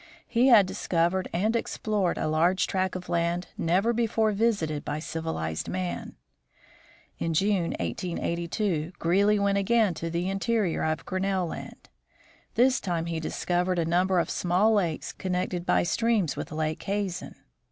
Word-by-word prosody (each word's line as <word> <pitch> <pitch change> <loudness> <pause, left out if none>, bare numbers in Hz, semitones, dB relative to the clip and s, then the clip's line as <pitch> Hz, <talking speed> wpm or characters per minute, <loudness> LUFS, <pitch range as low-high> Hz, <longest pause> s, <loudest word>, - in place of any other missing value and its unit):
He 240 +2 +3
had 225 -6 +7
discovered 180 +1 0
and 215 +7 +1
explored 210 -5 -1
a - - -1
large 170 +4 +2
tract 185 -1 -1
of 185 -1 -6
land 170 +1 -1
never 190 +8 +1
before 225 -1 +1
visited 200 -9 0
by 145 - -3
civilized 155 - -3
men. 90 -1 -4 1.0
In 165 -1 -1
June, 190 -1 +1
1882, 170 0 -2
Greely 200 +5 +3
went 200 0 +2
again 215 -1 +3
to 165 +1 -4
the 170 +2 -1
interior 195 -1 0
of 155 0 -1
Grinnell 190 0 0
land. 165 - -8 0.7
This 260 +2 +4
time 170 -3 -2
he 165 -1 -2
discovered 180 +3 -1
a 170 - +1
number 180 +3 +2
of 170 - +1
small 185 +5 +2
lakes, 175 -7 -1
connected 180 -1 -2
by - - +3
streams 200 -3 +1
with - - -6
Lake 155 0 -2
Hazen. 195 -3 -3
180 Hz, 145 wpm, -27 LUFS, 165-200 Hz, 1.0 s, had